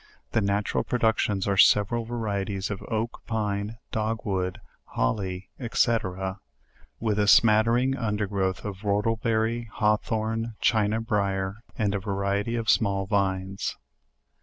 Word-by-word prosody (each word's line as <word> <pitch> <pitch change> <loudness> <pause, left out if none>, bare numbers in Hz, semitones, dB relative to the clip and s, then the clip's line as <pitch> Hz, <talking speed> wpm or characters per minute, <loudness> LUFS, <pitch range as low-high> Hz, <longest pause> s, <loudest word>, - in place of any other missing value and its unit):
The 110 - +2
natural 100 +1 0
productions 110 -5 +1
are. 100 -1 +1
several 110 +5 +4
varieties 100 -4 -2
of 100 - -4
oak, 115 +1 -2
pine, 105 0 -2
dog 110 +1 -1
wood, 95 -3 -1 0.3
holly, 90 +9 -2 0.2
&c. 120 -1 +4 1.0
with, 105 -2 0
a 105 - +2
scattering 115 +5 +5
undergrowth 105 -5 -1
of 100 -2 -4
whortleberry, 110 +2 0
hawthorn, 110 +1 0
china 110 -1 +2
brier, 100 -2 -1 0.2
and 100 -2 +1
a 100 - 0
variety 100 +3 -1
of 115 -1 -3
small 100 -3 +2
vines. 95 -1 -1
105 Hz, 115 wpm, -26 LUFS, 100-115 Hz, 1.0 s, scattering